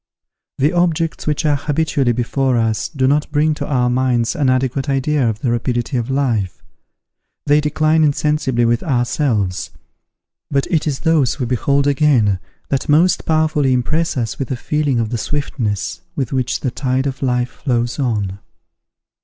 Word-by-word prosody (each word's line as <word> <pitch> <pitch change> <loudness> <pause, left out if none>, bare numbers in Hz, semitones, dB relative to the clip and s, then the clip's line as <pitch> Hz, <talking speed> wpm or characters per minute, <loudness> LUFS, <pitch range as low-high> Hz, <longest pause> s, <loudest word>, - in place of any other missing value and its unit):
The 145 +6 +2
objects 165 -3 0
which 150 +2 0
are 150 -1 +3
habitually 145 -3 0
before 125 +2 0
us 110 -1 0
do 135 -5 -1
not 150 +3 +1
bring 155 +1 +2
to - - -5
our 125 -4 +1
minds 125 -2 +1
an 140 -4 +1
adequate 130 +2 0
idea 135 -1 +1
of 110 0 -4
the 125 - 0
rapidity 120 +2 -1
of 120 0 -1
life; 120 -9 -1 0.8
they 145 +1 +4
decline 155 +1 +2
insensibly 145 -4 +1
with 115 0 +1
ourselves: 120 - 0 0.8
but 140 -1 +1
it 160 -3 +1
is 140 -3 -2
those 160 -7 +2
we 125 - 0
behold 140 +3 +1
again, 135 -9 +3 0.3
that 135 +1 -1
most 170 +5 +3
powerfully 155 -4 +2
impress 155 +5 0
us 115 -4 -3
with 135 - -3
a 130 - -1
feeling 145 -1 0
of 115 -2 -1
the 120 - -2
swiftness 105 - -3
with 135 -2 -2
which 130 -2 -1
the 130 - -1
tide 130 +1 -1
of 135 -2 -3
life 125 -2 0
flows 120 0 -2
on. 105 -7 -1
135 Hz, 160 wpm, -18 LUFS, 120-150 Hz, 0.8 s, they